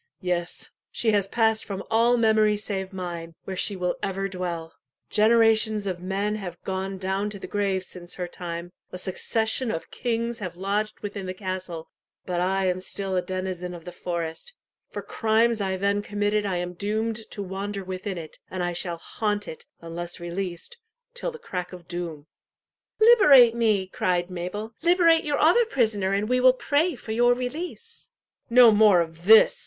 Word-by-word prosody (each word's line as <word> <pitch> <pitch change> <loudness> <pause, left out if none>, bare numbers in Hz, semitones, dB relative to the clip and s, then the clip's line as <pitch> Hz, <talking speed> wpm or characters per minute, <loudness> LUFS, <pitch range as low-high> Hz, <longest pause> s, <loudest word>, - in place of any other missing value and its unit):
yes, 175 -2 -2 0.2
she 225 - +1
has 200 -2 +2
passed 220 +1 +2
from 195 -1 -5
all 235 +2 +4
memory 215 -2 +3
save 195 -2 -4
mine, 170 -3 -6
where 190 - -5
she 200 +2 +1
will 180 -1 -1
ever 195 0 -2
dwell. 175 -3 -4 0.4
Generations 220 -1 +4
of 180 -2 -3
men 200 +3 -1
have 180 -4 -7
gone 190 0 -3
down 190 +2 -1
to 205 - -7
the - - -8
grave 195 -2 -1
since 180 -1 -7
her 180 -1 -3
time 175 0 -6 0.2
a - - -6
succession 220 +6 -1
of 165 - -4
kings 235 -1 -2
have 180 -5 -5
lodged 205 +3 -2
within 200 -2 -5
the 185 - -4
castle 185 -4 -5 0.4
but 175 -1 -1
I 190 +1 +1
am 180 0 0
still 190 0 -3
a 180 - +2
denizen 185 -1 -4
of 165 - -11
the 180 - -6
forest. 170 - -5 0.3
For - - -6
crimes 225 0 +2
I 190 -1 -1
then 200 +2 +1
committed 205 0 0
I 190 - -1
am 180 0 -3
doomed 215 +4 -2
to 205 - -5
wander 195 +1 -4
within 185 +1 -5
it, 160 -2 -9
and 185 -1 -3
I 175 0 -1
shall 175 0 -2
haunt 205 +4 -2
it, 160 - -9
unless 170 +1 -6
released, 175 - -5 0.3
till - - -3
the 475 - -9
crack 180 - -5
of 175 -2 -11
doom." 170 -4 -5 0.7
"Liberate 340 - +8
me!" 220 -5 +2
cried 180 -1 -1
Mabel; 185 +5 -5
"liberate 335 -1 +4
your 290 -1 0
other 405 +10 +5
prisoner 220 - +1
and 200 +2 0
we 250 +2 +2
will 255 0 +6
pray 290 +5 +1
for 225 - -8
your 240 +2 +4
release." 340 - -6 0.4
"No 240 -1 +8
more 210 -3 +6
of 165 +1 -6
this!" 220 - +7
195 Hz, 175 wpm, -25 LUFS, 180-220 Hz, 0.7 s, Liberate